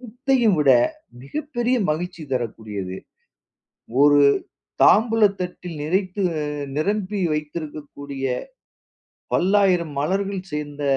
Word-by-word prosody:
குத்தையும் 245 -3 +1
விட 145 -3 +4 0.5
மிகப்பெரிய 255 - -2
மகிழ்ச்சி 170 +1 -3
தரக்கூடியது. 105 -6 -4 1.1
ஒரு 145 0 +6 0.6
தாம்பூல 225 +1 +5 0.2
தட்டில் 180 -1 -5
நிறைத்து 185 +4 -1 0.2
அ - - -1 0.3
நிரம்பி 200 +4 -1
வைத்திருக்கக்கூடிய 145 -3 -6 1.1
பல்லாயிரம் 185 -5 +2
மலர்கள் 195 +4 -1
சேர்ந்த 145 -1 -5
180 Hz, 80 wpm, -22 LUFS, 145-205 Hz, 1.1 s, ஒரு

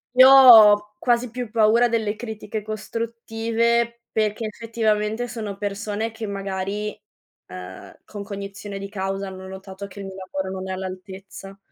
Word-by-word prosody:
Io 260 +1 +9
ho 215 -6 +8
quasi 240 -1 +1
più 245 -2 -5
paura 230 +2 +4
delle 220 -2 -1
critiche 220 -1 -6
costruttive 230 +2 -2
perché 215 +1 -1
effettivamente 220 +1 -1
sono 215 -4 -6
persone 210 +2 -3
che 220 -1 -6
magari, 200 +1 -4 0.5
ehm, 90 +1 -10
con 205 -1 -8
cognizione 200 0 -7
di 195 0 -7
causa 195 -1 -3
hanno 190 0 -9
notato 190 +1 -9
che 200 +1 -10
il - - -7
mio 190 - -8 0.2
lavoro 190 0 -3
non 190 - -6
è - - -2
all'altezza. 190 +1 -9
210 Hz, 145 wpm, -23 LUFS, 195-230 Hz, 0.5 s, Io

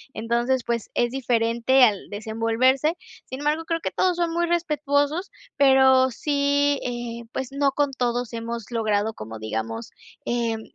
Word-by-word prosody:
Entonces, 235 +3 0
pues, 235 -2 -2
es 240 0 +1
diferente 240 0 +2
al 205 -5 +2
desenvolverse. 230 - +1 0.3
Sin 260 - -7
embargo, 305 +2 0
creo 330 0 -2
que - - -3
todos 365 -1 +1
son 340 -1 0
muy 345 0 +1
respetuosos. 300 0 0 0.3
Pero 265 -1 +5
sí, 285 +2 +1
eh, 240 -1 -5
pues 265 0 -4
no 280 0 +1
con 290 -1 +1
todos 245 -1 -2
hemos 230 0 -5
logrado, 220 -1 0
como 110 - -8
digamos, 110 +1 -4 0.3
em, 230 -2 -1
250 Hz, 145 wpm, -24 LUFS, 230-285 Hz, 0.3 s, Pero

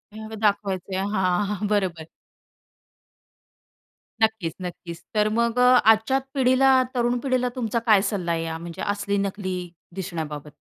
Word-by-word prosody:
ह्याला 220 0 -8
दाखवायचंय. 195 -3 0 0.2
हां 190 0 +1
हां, 210 0 -2
बरोबर. 185 -6 -1 2.1
नक्कीच, 220 -7 +1
नक्कीच. 175 -1 -7
तर 210 0 +3
मग 235 +1 +1
अ, 250 0 +6 0.2
आजच्या 225 +5 +2
पिढीला, 265 0 +4 0.2
तरुण 240 0 +1
पिढीला 255 -2 +1
तुमचा 235 -2 -1
काय 210 -3 +7
सल्ला 180 -5 -2
आहे 165 -1 -2
म्हणजे 170 0 -8
या - - -3
असली-नकली 200 -2 -2 0.4
दिसण्याबाबत? 160 -6 -5
205 Hz, 125 wpm, -24 LUFS, 180-225 Hz, 2.1 s, काय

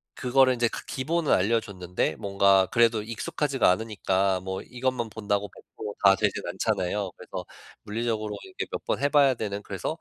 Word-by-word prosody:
그거를 130 0 +4
인제 120 -1 +2
그 - - -7
기본을 155 +3 -1
알려줬는데 100 -3 0
뭔가 100 -1 +3
그래도 115 -2 +3
익숙하지가 130 +3 0
않으니까 95 -3 0
뭐 95 0 -4
이것만 125 -2 -2
본다고 105 -2 -2
100% 105 - -9
다 95 0 +7
되진 - - -1
않잖아요. 100 -2 -1
그래서 - - -7 0.4
물리적으로 110 -1 -2
이렇게 95 - -5
몇 - - -5
번 - - -1
해봐야 140 -1 +4
되는 105 -2 -4
그래서 100 - -4
110 Hz, 380 characters per minute, -26 LUFS, 100-120 Hz, 0.4 s, 다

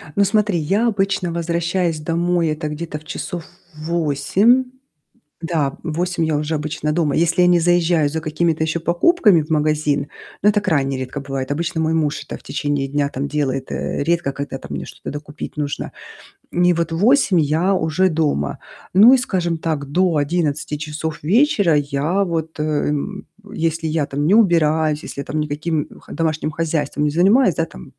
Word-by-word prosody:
Ну 200 - +4
смотри, 210 -2 +2
я 195 +10 +1
обычно 195 -4 0
возвращаюсь 170 0 -1
домой, 170 +1 0
это 155 0 -3
где-то 150 0 -5
в 155 - -20
часов 175 +2 -5 0.3
8. 170 - +2 0.8
Да, 155 -5 -1
в 160 -2 -4
8 180 0 -1
я 155 -2 +1
уже 150 +2 -2
обычно 150 0 -2
дома, 155 -3 +1
если 170 +2 +2
я 180 - +5
не 175 -1 +5
заезжаю 170 -2 +3
за 160 +2 -3
какими-то 160 0 0
еще 160 +1 -1
покупками 180 - +3
в 150 - -9
магазин, 150 -2 +1 0.4
но 210 - +6
это 210 0 +2
крайне 135 -8 0
редко 130 +2 -5
бывает. 135 -1 -4
Обычно 170 +2 -1
мой 160 0 +1
муж 150 -2 0
это - - -7
в - - -22
течение 145 -2 -2
дня 140 +1 0
там 140 0 -3
делает. 135 -3 -2
Э, - - -2
редко 165 -3 0
когда 140 -1 -5
там 75 - -9
мне - - -6
что-то - - -9
докупить 150 0 -8
нужно. 145 -1 -3 0.6
И 180 0 +4
вот 165 -1 -2
в - - -1
8 210 - +4
я 160 +6 +1
уже 180 +1 +1
дома. 150 - -1 0.3
Ну 210 +7 +8
и, - - +6
скажем 180 -8 -1
так, 155 -3 -2
до 180 +1 +2
11 150 -1 -1
часов 150 +1 -5
вечера 200 - +3
я, 145 +7 0
вот, 160 -3 -3
э, - - 0
м, 150 +5 -2 0.3
если 165 0 -1
я 155 -1 0
там 145 +2 -2
не 195 - +5
убираюсь, 160 -6 +3
если - - -7
я - - -8
там 155 - -2
никаким, 150 +1 -2
м, - - -14
х - - -12
домашним 155 -1 -1
хозяйством 155 -2 -1
не 150 - +2
занимаюсь, 190 - +4
да, 165 - 0
там 65 - -13
160 Hz, 185 wpm, -20 LUFS, 150-175 Hz, 0.8 s, Ну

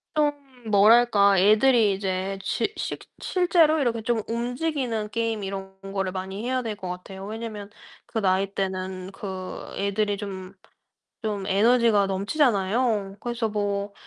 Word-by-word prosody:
좀 300 -1 +3 0.4
뭐랄까. 205 -1 +5
애들이 215 +1 +5
이제 190 0 -2
지 410 - -1
실 - - -3 0.2
실제로 340 -4 +3
이렇게 230 -4 0
좀 230 -1 0
움직이는 245 -2 -2
게임 225 -2 -2
이런 190 0 -6 0.2
거를 195 -2 -1
많이 190 +3 -5
해야 255 0 0
될 220 -3 -4
것 190 -2 -7
같아요. 190 +2 -7
왜냐하면 215 -1 -6 0.4
그 240 -2 -3
나이 195 0 +1
때는 190 -1 -3
그 190 -2 -6
애들이 200 +1 0
좀 195 -2 -7 0.7
좀 205 -3 -2
에너지가 215 0 +4
넘치잖아요. 205 -1 +1
그래서 235 -2 -2
뭐 205 -1 -2
205 Hz, 275 characters per minute, -25 LUFS, 195-235 Hz, 0.7 s, 뭐랄까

